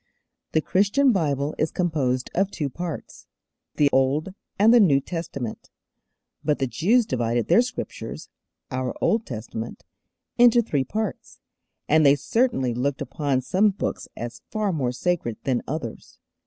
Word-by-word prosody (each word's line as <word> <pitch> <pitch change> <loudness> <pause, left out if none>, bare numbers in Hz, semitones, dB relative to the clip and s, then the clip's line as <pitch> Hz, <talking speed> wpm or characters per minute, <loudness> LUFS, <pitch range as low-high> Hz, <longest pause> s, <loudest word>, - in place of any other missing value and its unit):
The 160 - +3
Christian 205 - +3
Bible 145 - 0
is 155 - +2
composed 140 -8 -1
of 195 +2 +1
two 150 -8 -3
parts, 170 +1 -7 0.5
the 145 - +4
Old 140 +7 +2 0.2
and 220 +4 +6
the 240 - +7
New 155 -10 +5
Testament; 140 -7 -6 0.7
but 150 - +1
the 135 - 0
Jews 210 - +2
divided 120 - -1
their 230 - +6
Scriptures 250 0 -6 0.4
our 130 -1 -2
Old 225 0 +1
Testament 115 -1 -6 0.6
into 240 0 +6
three 145 -10 0
parts, 210 - -4 0.5
and 155 +1 +4
they 140 -1 +6
certainly 145 - +1
looked 135 +3 -1
upon 140 -4 -1
some 190 +10 +3
books 200 - -4
as 120 0 -6
far 210 -3 -1
more 130 -6 0
sacred 125 -4 -1
than 130 -3 0
others. 135 -6 -6
150 Hz, 140 wpm, -24 LUFS, 130-195 Hz, 0.7 s, the